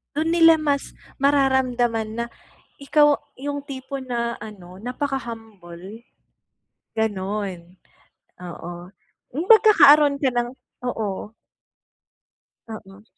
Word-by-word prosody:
Dun 320 +2 0
nila 330 -1 +6
mas 290 -3 -2 0.2
mararamdaman 250 -5 +1
na - - -4 0.5
ikaw 295 +1 +3 0.2
yung 285 +1 -5
tipo 270 0 -6
na 235 -2 -3
ano, 185 -4 -11
napa-kahumble, 225 - -7 0.9
gano'n. 195 -4 -3 0.6
Oo. 175 0 -8 0.5
Yung 320 - -1
magkakaroon 300 -10 +7
ka 270 -3 0
ng 240 0 -1 0.4
oo. 210 -4 -4 1.4
Oo. 210 -2 -11
240 Hz, 85 wpm, -22 LUFS, 205-280 Hz, 1.4 s, magkakaroon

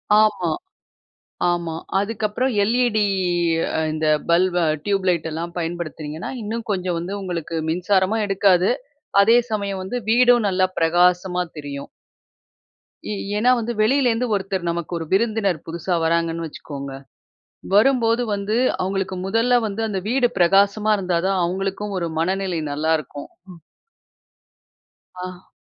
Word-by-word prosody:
ஆமா, 210 -5 +3 1.0
ஆமா. 170 -2 -1 0.2
அதுக்கப்புறம் 215 +4 -1
எல்இடி 230 0 +2 0.7
அ - - +1
இந்த 155 0 -1 0.2
பல்ப 175 +1 +3 0.2
அ - - -1
டியூப்லைட் 185 -5 +1
எல்லாம் 170 +2 -5
பயன்படுத்துனீங்கன்னா, 165 -2 -5
இன்னும் 225 +2 -4
கொஞ்சம் 180 -3 -1
வந்து 175 +4 -5
உங்களுக்கு 170 -3 -4
மின்சாரமும் 190 +5 +1
எடுக்காது, 195 -2 +3 0.5
அதே 225 +4 +6
சமயம் 200 -3 -2
வந்து 235 +7 -3
வீடும் 245 -1 +5
நல்லா 185 0 +2
பிரகாசமா 180 +2 +2
தெரியும். 140 -1 -6 1.2
ஏ - - -1 0.2
ஏன்னா 235 +4 +3
வந்து 235 0 -2
வெளியில 255 +4 +3
இருந்து 235 +2 -1
ஒருத்தர் 190 -2 -2
நமக்கு 170 0 -3
ஒரு 165 - -4
விருந்தினர் 200 -4 +1
புதுசா 170 +2 -2
வர்றாங்கன்னு 165 0 0
வச்சிக்கோங்க. 140 -3 -7 0.8
வரும்போது 230 +1 +4
வந்து 200 +2 -2 0.3
அவுங்களுக்கு 190 0 -2
முதல்ல 225 +5 +1
வந்து, 210 +2 -4
அந்த 200 -3 -2
வீடு 250 0 +3
பிரகாசமா 200 +4 +3
இருந்தா 180 -3 0
தான் 195 -1 +1
அவுங்களுக்கும் 195 +3 -3
ஒரு 170 - -2
மனநிலை 185 0 -1
நல்லா 155 +3 0
இருக்கும். 145 0 -9 0.2
ம். 175 - -13 1.6
அ. 185 0 -8
190 Hz, 125 wpm, -22 LUFS, 170-215 Hz, 1.6 s, அதே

